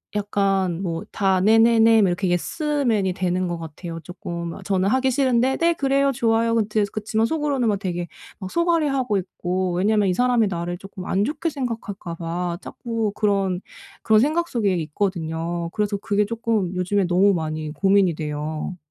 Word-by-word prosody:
약간 195 -3 0
뭐 170 -3 -3
다 190 -2 +1
"네네네." 225 +1 +5
막 195 - +4
이렇게 175 +1 -1
예스맨이 230 - 0
되는 185 0 -1
것 175 - -3
같아요, 165 +1 -7
조금. 170 -1 -6
저는 190 -1 +1
하기 260 +4 +2
싫은데 260 -1 +2
"네. 335 0 +3
그래요. 275 -2 +1
좋아요." 230 -1 +2
그티에서 215 -2 0
그치만 220 +1 0
속으로는 285 -4 0
막 205 - +2
되게 175 -3 -3 0.3
막 190 -2 -6
속앓이하고 290 - +1
있고. 185 0 -2
왜냐하면 205 +2 +2
이 185 - +2
사람이 245 0 +2
나를 175 -1 -3
쪼끔 190 0 -9
안 200 +2 +1
좋게 315 +5 -2
생각할까 225 - -5
봐 170 +1 -3
자꾸 230 -3 -3
그런 195 -3 +1 0.4
그런 220 -1 +4
생각 320 +6 +1
속에 210 - 0
있거든요. 170 0 -2
그래서 210 -1 -1
그게 205 0 0
조금 220 -4 -1
요즘에 185 +2 0
너무 185 +3 +4
많이 155 -2 -3
고민이 195 0 +3
돼요. 155 +3 -4
200 Hz, 355 characters per minute, -23 LUFS, 175-230 Hz, 0.4 s, 네네네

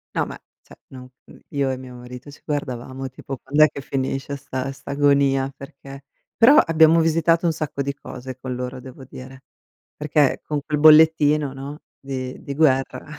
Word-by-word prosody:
No, - - +1
ma, - - -8 0.3
cioè - - -15 0.2
no 130 -1 -11 0.2
mhmm, - - -17 0.2
io 140 -1 +1
e 130 - -4
mio 125 -1 -11
marito 125 +3 -11
ci - - -17
guardavamo 130 -2 -4
tipo: 135 +1 -8
"Quand'è 150 +4 +3
che - - -9
finisce 135 +1 -3
'sta 130 -1 -5
'sta 135 - -10
agonia? 140 -1 +2
Perché?" 135 0 -12 0.3
Però, 240 +6 +6
abbiamo 165 - +5
visitato 165 +1 +2
un 165 - +2
sacco 150 -3 -4
di 140 0 -2
cose 130 -2 -9
con 130 0 -6
loro 125 +1 -6
devo 130 +1 -12
dire, 130 +1 -12 0.5
perché 150 -2 +1
con 150 -1 -3
quel 150 -2 -2
bollettino, 150 -2 +5
no, 140 +2 -8 0.2
di 130 -2 -6
di 140 - -6
guerra. 135 -4 +1
140 Hz, 175 wpm, -22 LUFS, 130-150 Hz, 0.5 s, Però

